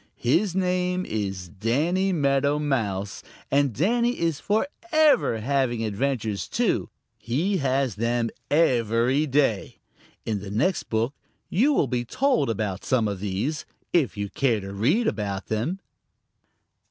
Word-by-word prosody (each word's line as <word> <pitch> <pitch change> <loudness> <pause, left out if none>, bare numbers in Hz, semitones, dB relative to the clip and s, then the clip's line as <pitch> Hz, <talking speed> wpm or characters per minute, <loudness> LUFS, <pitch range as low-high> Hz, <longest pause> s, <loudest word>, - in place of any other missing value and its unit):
His 175 - +1
name 180 -1 0
is 95 -4 -3
Danny 145 - 0
Meadow 140 -3 +2
Mouse, 105 -10 -2 0.3
and 140 -1 +3
Danny 235 - +1
is 165 -3 0
forever 285 - +2
having 125 -2 0
adventures 110 -1 -2
too. - - 0 0.3
He 145 - 0
has 135 -4 0
them 115 +1 0 0.2
every 125 -1 +2
day. 135 -7 +1 0.5
In 110 -3 -1
the 100 0 -8
next 125 - 0
book 115 +4 0 0.4
you 250 - +3
will 210 - +3
be 125 -1 -1
told 255 - +1
about 105 -3 -2
some 120 -4 +1
of 100 -2 -3
these, 105 +10 -2 0.3
if 140 - +2
you 100 -1 -3
care 120 -5 +1
to 100 0 -7
read 145 - +2
about 100 - -2
them. 120 - -1
130 Hz, 130 wpm, -25 LUFS, 110-170 Hz, 0.5 s, and